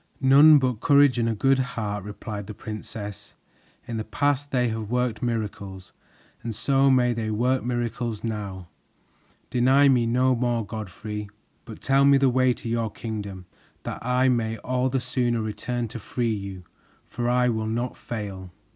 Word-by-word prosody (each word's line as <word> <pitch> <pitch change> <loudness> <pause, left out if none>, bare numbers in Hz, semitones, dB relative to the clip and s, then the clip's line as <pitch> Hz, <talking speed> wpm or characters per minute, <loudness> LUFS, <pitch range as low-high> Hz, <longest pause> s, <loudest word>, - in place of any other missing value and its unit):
"None 145 +3 +7
but 130 -5 0
courage 140 -1 +4
and 115 0 +1
a 115 - -1
good 135 +5 +3
heart," 110 -6 -3
replied 105 0 -7
the 110 - -7
princess. 105 -1 -8 0.5
"In 115 - -4
the 110 - -2
past 145 +4 0
they 125 -3 +1
have 110 -2 -4
worked 125 -3 -1
miracles, 100 -5 -4 0.5
and 115 -2 -5
so 135 +4 +3
may 125 -2 +3
they 110 -2 -3
work 125 +4 +1
miracles 120 -2 -3
now. 100 -5 -5 0.8
Deny 135 +3 +4
me 125 -3 +3
no 130 +2 +3
more, 120 -2 0
Godfrey, 105 0 -6 0.4
but 110 - -10
tell 135 +1 +3
me 140 0 +6
the 135 -1 +3
way 130 0 +3
to 120 - -5
your 115 -1 -1
kingdom, 100 -4 -6 0.4
that - - -6
I 125 +2 +2
may 115 -3 0
all 125 +3 -1
the 135 +1 0
sooner 120 -2 0
return 110 +3 -3
to 115 +1 -7
free 115 +1 -2
you, 100 -3 -6 0.4
for 120 0 -3
I 125 0 +3
will 110 -2 -1
not 120 +3 -2
fail." 100 -5 -6
120 Hz, 165 wpm, -25 LUFS, 110-125 Hz, 0.8 s, None